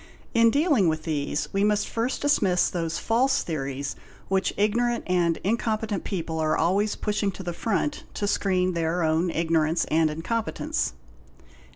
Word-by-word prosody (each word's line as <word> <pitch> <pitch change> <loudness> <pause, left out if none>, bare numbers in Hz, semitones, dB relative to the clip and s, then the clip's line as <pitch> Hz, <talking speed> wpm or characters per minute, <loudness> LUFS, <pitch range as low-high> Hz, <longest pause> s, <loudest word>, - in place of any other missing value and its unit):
In 230 0 +5
dealing 285 - +3
with 155 -1 0
these 150 -2 -2
we 195 +1 +2
must 210 0 +2
first 235 +5 -2
dismiss 195 -11 +3
those 165 -2 -2
false 255 +4 +2
theories 140 -3 -3 0.3
which 190 0 +1
ignorant 235 +3 +1
and 175 -2 +1
incompetent 215 -1 -1
people 165 -4 -3
are 155 0 +1
always 200 +5 +1
pushing 210 -1 -1
to 190 - -8
the 175 -1 -3
front 230 - -2
to 205 - -1
screen 185 -2 +1
their 170 +1 0
own 160 +3 +2
ignorance 165 0 +1
and 160 0 +3
incompetence. 230 - -2
185 Hz, 150 wpm, -25 LUFS, 165-220 Hz, 0.3 s, In